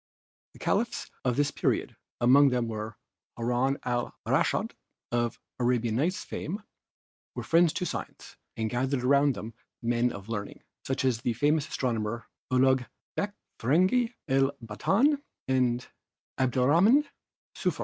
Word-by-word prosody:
The - - -16
Caliphs - - -1
of 125 -2 +1
this 145 +1 +2
period, - - 0 0.2
among 135 +4 +6
whom 125 -2 0
was 110 +1 -4 0.4
Haroun 125 +3 +1
al 120 -1 -1
Raschid - - +1 0.4
of 120 -1 0 0.2
'Arabian 120 -2 +1
Nights' 165 +9 0
fame, 200 +7 -5 0.7
were - - -4
friends 165 0 +4
to 180 - -2
science - - -6 0.2
and 110 -1 0
gathered 125 +3 -1
around 140 +1 +4
them 115 +2 -7 0.3
men 120 +1 +2
of 100 -2 -9
learning, 105 -3 -5 0.2
such 130 0 0
as 120 -3 +1
the 120 - 0
famous 145 +5 +2
astronomers 115 -2 -2 0.3
Ulug 130 -1 +3 0.3
Bekh, 205 0 -1 0.3
Fergani, 185 - +3
El 135 0 +3
Batan 210 - +2 0.3
and 125 -2 +1 0.5
Abdelrahman 155 - +4 0.5
Sufi. - - -1
130 Hz, 130 wpm, -28 LUFS, 120-145 Hz, 0.7 s, among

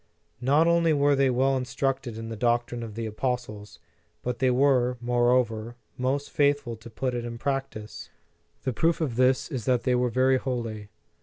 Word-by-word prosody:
Not 145 +6 +4
only 170 -1 +3
were 145 0 +3
they 135 -1 +3
well 130 +2 +2
instructed 130 -1 -2
in 115 0 -6
the 115 - -5
doctrine 120 +1 0
of 110 -3 -7
the 115 0 -3
apostles, 110 -2 -4 0.5
but 125 -1 -3
they 130 - +3
were, 125 -1 +3
more 120 0 +1
over, 115 -2 0 0.2
most 135 +3 -2
faithful 145 -5 +1
to 110 +2 -12
put 130 +3 -3
it 120 -1 -3
in 120 0 -6
practice. 135 -5 -4 0.5
The 130 - -1
proof 165 +7 +1
of 145 -8 -2
this 130 +4 +2
is 125 -6 -4
that 125 -2 +2
they 125 - +2
were 125 0 +2
very 130 +2 +3
holy. 115 -6 -4
125 Hz, 180 wpm, -26 LUFS, 120-135 Hz, 0.5 s, Not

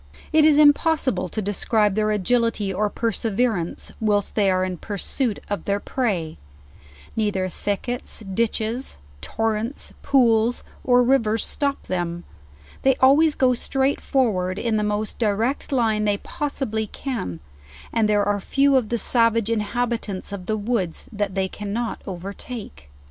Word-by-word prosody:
It 310 -1 +6
is 305 -2 +6
impossible 290 - +3
to 215 - -3
describe 205 +1 +1
their 215 +1 +1
agility 215 -1 +1
or 210 +3 0
perseverance, 225 -4 -1
whilst 205 -2 +1
they 205 -3 +3
are 185 0 +2
in 185 -1 -3
pursuit 215 - -2
of 205 -4 -3
their 200 0 0
prey; 195 - -2 0.8
neither 205 -4 0
thickets, 210 +7 -3
ditches, 220 +4 -2 0.2
torrents, 225 - -2
pools, 240 -4 +3 0.2
or 245 -1 +5
rivers 230 -4 +2
stop 280 -1 -1
them; 175 -1 -3 0.6
they 265 -1 +4
always 290 +4 +5
go 255 -1 +3
straight 265 +3 0
forward 190 -9 0
in 230 0 0
the 210 - +1
most 210 +1 -2
direct 225 +6 0
line 220 -5 +2
they 205 -1 +2
possibly 220 -5 -3
can, 205 - -4 0.5
and 225 -2 +2
there 205 -1 +3
are 205 0 +1
few 275 +6 +3
of 235 -5 0
the 235 - 0
savage 230 0 +2
inhabitants 225 -2 -2
of 190 -3 -7
the 215 - 0
woods 205 -5 -2
that 205 -3 -2
they 190 -1 +1
cannot 210 +4 -4
overtake. 195 - -7
220 Hz, 140 wpm, -23 LUFS, 200-245 Hz, 0.8 s, It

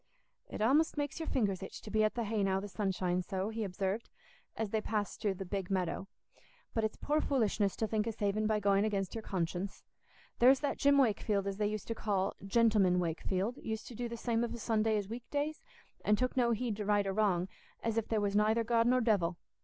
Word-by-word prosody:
"It - - -5
a'most 290 +9 +3
makes 290 +2 -2
your 320 - -4
fingers 200 -7 0
itch 195 - -7
to 210 - -9
be 215 +1 +3
at 215 - +1
the 235 - -1
hay 215 -1 -1
now 190 -1 +2
the 200 - -5
sun 205 0 -2
shines 180 -1 -1
so," 190 0 -2
he 225 0 -3
observed, 195 +2 -2 0.5
as 220 -3 -2
they 220 - +1
passed 210 -1 -2
through 200 -3 0
the 195 - -6
"Big 190 0 -3
Meadow." 190 0 -1 0.7
"But 225 - 0
it's 220 - -1
poor 300 +1 +1
foolishness 215 -7 +1
to 220 - 0
think 215 0 -1
o' - - +1
saving 215 0 0
by 215 -1 +2
going 200 0 +3
against 200 -3 -1
your 225 - -4
conscience. 185 0 -3 0.6
There's 260 +2 +6
that 285 -2 -1
Jim 280 0 +5
Wakefield, 210 -5 +2
as 195 -1 -3
they 210 0 +1
used 215 0 -4
to 230 - -1
call 200 -3 -1
'Gentleman 200 -3 +3
Wakefield,' 185 +6 -1
used 220 -1 -5
to - - -9
do 240 +1 -4
the 235 - -5
same 230 0 0
of 235 - -3
a - - -5
Sunday 220 -1 +1
as 205 - -2
o' - - -15
weekdays, 285 +6 -3 0.4
and 210 0 +3
took 255 +2 0
no 245 -2 +3
heed 230 -2 -1
to 210 - -3
right 205 -1 +2
or 195 - -1
wrong, 190 -4 +2 0.4
as 230 -1 0
if 230 -1 0
there 220 - +1
was 200 0 0
nayther 215 +2 +3
God 230 0 +2
nor 255 +1 +4
devil. 190 -7 +2
215 Hz, 230 wpm, -33 LUFS, 195-230 Hz, 0.7 s, There's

